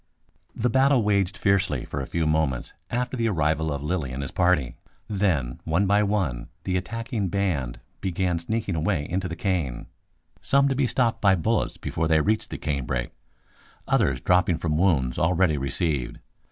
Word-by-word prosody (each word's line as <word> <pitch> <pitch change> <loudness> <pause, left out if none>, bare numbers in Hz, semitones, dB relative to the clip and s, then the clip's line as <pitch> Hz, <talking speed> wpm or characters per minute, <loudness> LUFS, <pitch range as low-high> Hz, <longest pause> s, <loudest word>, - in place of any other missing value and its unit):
The 120 +1 0
battle 135 -1 +4
waged 100 -3 +1
fiercely 95 -9 +1
for 70 - -4
a 65 - -5
few 85 -1 -1
moments 75 -5 0 0.2
after 125 +2 -2
the 115 -2 +1
arrival 80 -3 +1
of 70 0 -3
Lilly 75 -4 -2
and 65 +2 -4
his 70 - -5
party; 90 -8 +2 0.3
then 90 - 0
one 80 +5 +1
by 100 +2 +3
one 95 -13 -1 0.2
the 95 - -1
attacking 115 +2 -2
band 85 -10 -1 0.2
began 90 -2 -1
sneaking 105 +3 -2
away 80 -1 0
into 90 +1 -2
the 85 - -5
cane, 85 - -2 0.6
some 140 0 +4
to 135 - 0
be 130 -1 +2
stopped 120 -2 +1
by 95 -2 +5
bullets 110 +6 0
before 80 0 -2
they 80 -1 +4
reached 110 +7 0
the - - -5
canebrake, 65 -4 -2 0.8
others 65 -2 +2
dropping 90 -2 +3
from 80 -2 -1
wounds 75 -8 +2
already 85 -3 +2
received. 70 -1 -1
90 Hz, 165 wpm, -25 LUFS, 75-100 Hz, 0.8 s, by